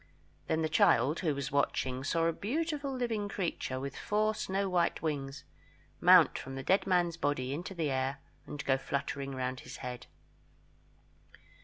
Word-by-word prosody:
Then 160 0 +1
the - - +2
child, 150 -1 +4
who 155 -6 0
was 140 +1 -3
watching, 130 -2 0
saw 165 +3 +1
a 165 - +2
beautiful 290 - -2
living 230 -5 -2
creature, 170 -9 -2
with 140 +1 -5
four 215 +1 +1
snow 195 -1 -1
white 175 -3 +1
wings, 140 -3 -3 0.6
mount - - +6
from 135 0 -7
the 135 - -5
dead 190 +8 +2
man's 175 -2 +2
body 135 -4 -1
into 175 +6 -5
the 160 -4 -1
air 135 +1 -1 0.3
and 145 - -6
go 135 0 +2
fluttering 140 0 -3
round 130 0 -2
his - - -9
head. 125 -1 -6
155 Hz, 160 wpm, -32 LUFS, 135-190 Hz, 0.6 s, mount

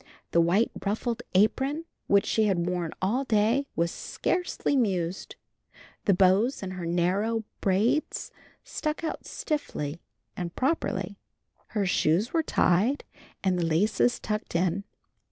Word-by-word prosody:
The 170 - +5
white 185 +7 +3
ruffled 225 +3 -1
apron 265 - +2 0.2
which 200 -1 +4
she 220 - +2
had 180 -4 +1
worn 180 -2 -1
all 235 +8 +1
day 230 +4 +2
was 170 +1 +1
scarcely 355 -5 -1
mussed. 190 -8 -1 0.7
The 200 - +5
bows 195 +7 +3
on 185 - -4
her 180 -2 -5
narrow 195 +7 +1 0.2
braids 220 +10 +1 0.3
stuck 305 +1 -3
out 315 - -4
stiffly 170 - -3 0.3
and 175 -1 -5
properly. 280 +6 -1 0.6
Her 200 - +2
shoes 180 +4 +2
were 330 - +3
tied 230 - +2 0.4
and 185 -2 +2
the - - +1
laces 205 +8 +2
tucked 210 -4 -4
in. 180 +3 +1
200 Hz, 130 wpm, -27 LUFS, 180-245 Hz, 0.7 s, The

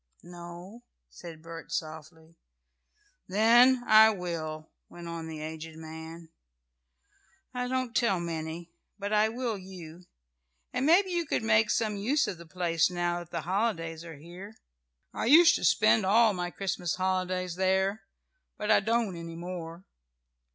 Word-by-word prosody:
"No," 175 +5 -11 0.3
said 160 - -11
Bert, 165 0 -10
softly. 160 +1 -7 0.9
"Then 240 +5 +5
I 220 0 +7
will," 165 -5 -5 0.2
went 175 -1 -10
on 165 -1 -6
the 160 -1 -7
aged 160 +1 -7
man. 160 +1 -10 1.2
"I 250 0 -2
don't 255 -2 -2
tell 210 -5 +2
many, 165 0 -5 0.3
but 205 +1 -4
I 215 +1 +3
will 230 -2 -3
you. 180 -2 -11 0.7
And 270 - 0
maybe 370 +4 +4
you 345 -3 -1
could 230 - -1
make 220 -1 +3
some 215 -3 0
use 260 +9 +1
of 175 - -5
the 170 - -12
place 170 -1 +1
now 175 -1 -1
that 175 -1 -10
the - - -4
holidays 170 -4 -2
are 165 -3 -10
here. 180 +8 -11 0.6
I - - -3
used 325 +7 +7
to - - -7
spend 220 - +4
all 220 +3 +4
my 180 -1 -3
Christmas 180 -2 -3
holidays 185 -1 -1
there, 190 +3 0 0.6
but 210 0 -1
I 205 - +6
don't 225 -2 0
any 165 0 -8
more. 170 0 -7
180 Hz, 145 wpm, -28 LUFS, 165-215 Hz, 1.2 s, I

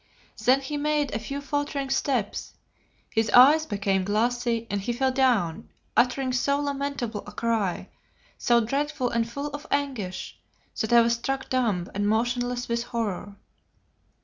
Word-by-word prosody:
Then 260 +2 +5
he 290 +2 -4
made 295 -1 0
a 215 - -1
few 275 +6 -5
faltering 285 -1 -2
steps, 255 -7 -1 0.6
his 225 -1 +1
eyes 295 +7 +7
became 200 -2 0
glassy, 230 +3 0
and 200 0 -2
he 240 +5 -2
fell 260 +2 +1
down, 245 -11 +1 0.3
uttering 255 +1 +2
so 280 +3 +1
lamentable 280 -6 -3
a - - -7
cry, 220 -4 -1 0.5
so 235 -1 +3
dreadful 275 +2 -1
and 230 0 0
full 280 +5 -4
of 290 +1 -8
anguish, 255 -10 -3 0.4
that 220 - -1
I 235 0 +8
was 235 0 +3
struck 265 +3 -3
dumb 215 -9 +1
and 205 +1 0
motionless 245 +2 0
with 235 0 -1
horror. 210 -4 -3
245 Hz, 150 wpm, -26 LUFS, 220-275 Hz, 0.6 s, I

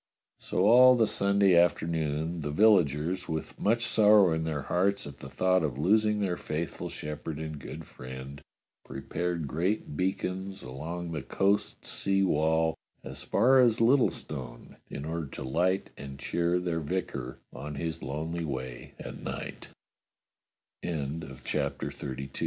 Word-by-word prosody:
So 95 - 0
all 125 +3 +8
that 115 -2 +4
Sunday 100 -2 +3
afternoon 80 -1 +1
the 75 - -3
villagers, 90 -1 +3
with 80 0 -4
much 115 +2 +2
sorrow 105 -5 +5
in 80 0 -1
their 75 -4 -2
hearts 95 +5 +1
at 70 -1 -10
the 65 - -9
thought 90 +7 +2
of 70 -5 -2
losing 105 +6 +3
their 90 -3 0
faithful 80 +2 -4
shepherd 75 0 -5
and 80 -1 -5
good 75 +4 -8
friend, 65 +2 -9 0.4
prepared 80 +4 -3
great 85 +3 -1
beacons 95 +2 -2
along 85 +7 -5
the 75 -3 -3
coast 100 +10 0
sea 95 0 +1
wall 80 -1 +2 0.3
as - - -8
far 130 +2 +4
as 120 -3 +5
Littlestone, 80 - 0
in 70 - -6
order 80 -1 -3
to - - -7
light 90 +8 0
and 70 -1 -8
cheer 85 +4 0
their 85 -2 -1
vicar 75 -6 -3 0.2
o 70 +3 -7
85 Hz, 120 wpm, -29 LUFS, 75-100 Hz, 0.4 s, all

